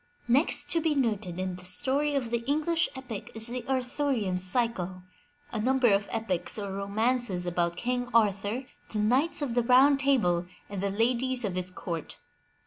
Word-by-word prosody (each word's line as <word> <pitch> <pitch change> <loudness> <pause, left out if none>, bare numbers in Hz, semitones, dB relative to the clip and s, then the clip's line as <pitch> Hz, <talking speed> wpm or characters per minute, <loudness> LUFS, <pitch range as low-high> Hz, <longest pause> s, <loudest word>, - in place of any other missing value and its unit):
Next 265 +7 +2
to 335 - +2
be 315 -2 +1
noted 215 -9 -1
in 185 -1 -3
the 180 - -13
story 275 +10 +1
of 245 -4 -1
the 235 - +1
English 320 +4 +1
epic 250 -6 -7
is 225 0 -2
the 245 +1 -3
Arthur 265 +2 -1
ian 195 -8 0
Cycle, 185 -3 0 0.5
a 220 - -3
number 255 -2 +3
of 200 +1 +1
epics 195 -6 -1
or 200 -2 -4
romances 200 -1 0
about 175 -1 0
King 245 0 -2
Arthur, 210 +2 +1 0.3
the 220 - -3
Knights 260 +10 +2
of 255 -5 -2
the 245 - +3
Round 260 +4 +5
Table 210 -11 +2 0.2
and 200 -2 -4
the 200 - 0
ladies 245 +4 +1
of 195 - -2
his 185 0 0
court. 170 -3 -6
230 Hz, 175 wpm, -28 LUFS, 190-260 Hz, 0.5 s, Round